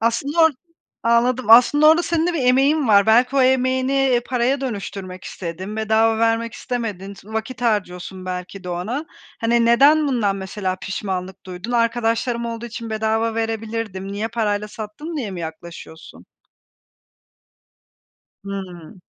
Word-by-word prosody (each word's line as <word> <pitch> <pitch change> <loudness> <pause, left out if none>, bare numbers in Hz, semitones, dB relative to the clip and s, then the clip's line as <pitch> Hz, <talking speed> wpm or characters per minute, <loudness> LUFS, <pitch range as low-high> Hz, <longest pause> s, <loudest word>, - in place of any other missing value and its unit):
Aslında 235 +8 -1
or 320 - +6 0.5
anladım. 235 +1 +2
Aslında 270 +6 +7
orada 325 +2 +5
senin 335 -1 0
de 355 - 0
bir 275 - -1
emeğin 270 +2 +3
var. 200 -1 +5
Belki 245 +5 +4
o 265 - +5
emeğini, 260 +1 +2
eee, 265 -3 +3
paraya 255 +2 0
dönüştürmek 195 -6 -6
istedin, 185 +4 -6
bedava 220 +1 +2
vermek 230 0 +1
istemedin, 210 -6 -5
s 200 - -16
vakit 220 +2 -5
harcıyorsun 190 -4 -2
belki 180 +1 -6
de - - -6
ona. 215 - -3 0.4
Hani 235 +1 +2
neden 285 +6 +5
bundan 210 -7 0
mesela 190 -1 -3
pişmanlık 190 -1 -5
duydun? 185 +6 -6
"Arkadaşlarım 235 0 0
olduğu 230 0 -5
için 230 0 -7
bedava 220 +1 0
verebilirdim, 225 -3 -3
niye 210 +2 -3
parayla 210 -2 -1
sattım?" 225 +11 -7
diye 235 -9 -3
mi 180 -2 -6
yaklaşıyorsun? 160 - -10 2.2
Hıı. 185 -4 -8
225 Hz, 140 wpm, -21 LUFS, 195-250 Hz, 2.2 s, Aslında